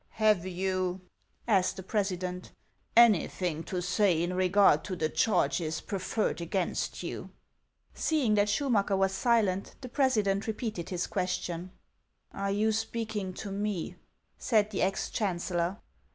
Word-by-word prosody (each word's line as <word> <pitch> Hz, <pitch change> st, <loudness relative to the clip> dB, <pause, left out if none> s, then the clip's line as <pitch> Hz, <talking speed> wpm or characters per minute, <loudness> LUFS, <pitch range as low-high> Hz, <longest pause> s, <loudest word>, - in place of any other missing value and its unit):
" -, -, -41 dB
Have 210 Hz, -4 st, +4 dB
you," 185 Hz, 0 st, -1 dB, 0.5 s
asked 190 Hz, -4 st, +3 dB
the 190 Hz, -, -6 dB
president, 185 Hz, -3 st, -2 dB, 0.2 s
" -, -, -14 dB
anything 175 Hz, -5 st, -1 dB
to 180 Hz, -2 st, -3 dB
say 180 Hz, -2 st, +2 dB
in 175 Hz, +1 st, -1 dB
regard 185 Hz, -4 st, +4 dB
to 190 Hz, -, -3 dB
the 155 Hz, -3 st, -1 dB
charges 160 Hz, -4 st, +1 dB
preferred 195 Hz, -1 st, -2 dB
against 175 Hz, +2 st, -2 dB
you? -, -, -5 dB, 0.3 s
" -, -, -47 dB, 0.3 s
Seeing 290 Hz, -9 st, +1 dB
that 205 Hz, 0 st, +3 dB
Schumacker 205 Hz, -5 st, +1 dB
was 195 Hz, 0 st, +2 dB
silent, 200 Hz, -3 st, +1 dB
the 255 Hz, -, -7 dB
president 215 Hz, -8 st, +1 dB
re 220 Hz, -, 0 dB
peated 210 Hz, -7 st, -4 dB
his 180 Hz, -1 st, -1 dB
question. 180 Hz, -2 st, -3 dB, 0.3 s
" -, -, -50 dB, 0.3 s
Are 200 Hz, 0 st, -2 dB
you 210 Hz, +2 st, +2 dB
speaking 220 Hz, -3 st, -3 dB
to 200 Hz, -, -6 dB
me? 200 Hz, -3 st, -3 dB, 0.2 s
" -, -, -46 dB
said 215 Hz, -2 st, +2 dB
the 195 Hz, -, -2 dB
ex 195 Hz, +1 st, 0 dB
chancellor. 175 Hz, -2 st, -1 dB
195 Hz, 150 wpm, -29 LUFS, 180-210 Hz, 0.5 s, Have